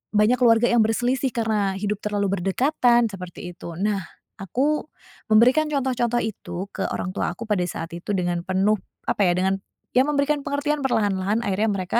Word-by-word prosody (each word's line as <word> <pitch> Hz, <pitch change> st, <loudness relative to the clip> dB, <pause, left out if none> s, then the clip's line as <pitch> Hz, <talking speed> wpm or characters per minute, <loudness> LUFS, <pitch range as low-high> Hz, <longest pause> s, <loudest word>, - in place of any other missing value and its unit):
banyak 215 Hz, +4 st, +4 dB
keluarga 235 Hz, -1 st, +5 dB
yang 240 Hz, -, +4 dB
berselisih 250 Hz, +4 st, 0 dB
karena 215 Hz, -4 st, 0 dB
hidup 210 Hz, 0 st, -2 dB
terlalu 200 Hz, -2 st, 0 dB
berdekatan, 240 Hz, -, +2 dB
seperti 180 Hz, -2 st, -8 dB
itu. 170 Hz, -1 st, -8 dB
Nah, 205 Hz, 0 st, +1 dB, 0.4 s
aku 265 Hz, -, 0 dB, 0.5 s
memberikan 250 Hz, +8 st, +5 dB
contoh-contoh 250 Hz, -4 st, 0 dB
itu 200 Hz, -3 st, -5 dB
ke 195 Hz, -, -4 dB
orang 185 Hz, -, -3 dB
tua -, -, -1 dB
aku 230 Hz, -, -7 dB
pada 195 Hz, -4 st, +2 dB
saat 165 Hz, -, -5 dB
itu 175 Hz, +4 st, -5 dB
dengan 175 Hz, -2 st, 0 dB
penuh, 190 Hz, +3 st, +2 dB, 0.3 s
apa, 205 Hz, -, +2 dB
ya 175 Hz, -, +4 dB
dengan 190 Hz, +1 st, +1 dB, 0.4 s
ya, 255 Hz, -, +6 dB
memberikan 290 Hz, 0 st, +1 dB
pengertian 290 Hz, 0 st, -1 dB
perlahan-lahan 205 Hz, -3 st, +1 dB
akhirnya 205 Hz, +2 st, 0 dB
mereka 195 Hz, +3 st, 0 dB
215 Hz, 165 wpm, -23 LUFS, 195-250 Hz, 0.5 s, ya